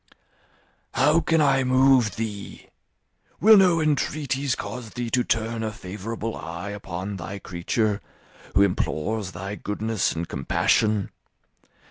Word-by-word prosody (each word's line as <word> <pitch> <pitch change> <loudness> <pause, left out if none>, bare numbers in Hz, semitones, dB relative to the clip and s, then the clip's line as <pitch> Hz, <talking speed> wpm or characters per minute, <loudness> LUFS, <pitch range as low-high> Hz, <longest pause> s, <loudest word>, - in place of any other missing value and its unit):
"How 150 +5 +4
can 165 -1 +2
I 135 -2 +3
move 130 -3 +4
thee? 105 -3 -6 0.7
Will 220 +1 +8
no 180 -4 +5
entreaties 140 -3 0
cause 125 -3 -6
thee 120 0 -5
to 125 - +2
turn 115 0 -1
a 110 -1 -2
favourable 105 +3 -5
eye 85 +4 -6
upon 100 -1 -5
thy 95 +3 -6
creature, 100 +4 -1 0.5
who 100 - +6
implores 100 +1 -1
thy 95 +3 -5
goodness 105 +1 -1
and 85 +1 -4
compassion? 105 +9 +1
110 Hz, 120 wpm, -24 LUFS, 100-130 Hz, 0.7 s, Will